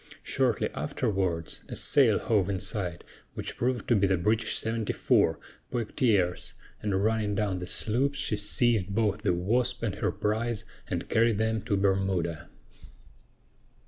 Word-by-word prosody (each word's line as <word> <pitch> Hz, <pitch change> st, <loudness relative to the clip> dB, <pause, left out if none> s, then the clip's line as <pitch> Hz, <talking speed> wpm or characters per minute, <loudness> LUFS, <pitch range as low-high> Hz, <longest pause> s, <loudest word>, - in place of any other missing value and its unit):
Shortly -, -, +1 dB
afterwards, 90 Hz, -, -2 dB
a -, -, -5 dB
sail -, -, +4 dB
hove 100 Hz, -4 st, +1 dB
in 95 Hz, -2 st, -1 dB
sight, 90 Hz, -6 st, -3 dB, 0.3 s
which -, -, -5 dB
proved 125 Hz, -2 st, -1 dB
to 120 Hz, -, +4 dB
be 100 Hz, -1 st, +3 dB
the 95 Hz, -1 st, +2 dB
British 110 Hz, +5 st, +1 dB
74, 110 Hz, -1 st, +1 dB, 0.3 s
Poictiers, 105 Hz, -6 st, 0 dB, 0.3 s
and, 100 Hz, -2 st, 0 dB
running 110 Hz, -2 st, +1 dB
down 105 Hz, 0 st, 0 dB
on 95 Hz, -1 st, -2 dB
the 90 Hz, -, -6 dB
sloops, 135 Hz, +9 st, +1 dB
she 135 Hz, -5 st, 0 dB
seized 105 Hz, -1 st, +1 dB
both 105 Hz, -2 st, +1 dB
the -, -, +1 dB
Wasp 120 Hz, +7 st, 0 dB
and 105 Hz, -4 st, 0 dB
her 100 Hz, -, -1 dB
prize 110 Hz, +1 st, -1 dB, 0.2 s
and -, -, -3 dB
carried 115 Hz, -1 st, +3 dB
them 110 Hz, 0 st, 0 dB
to 105 Hz, -2 st, -1 dB
Bermuda. 95 Hz, -4 st, 0 dB
105 Hz, 145 wpm, -28 LUFS, 95-115 Hz, 0.3 s, sail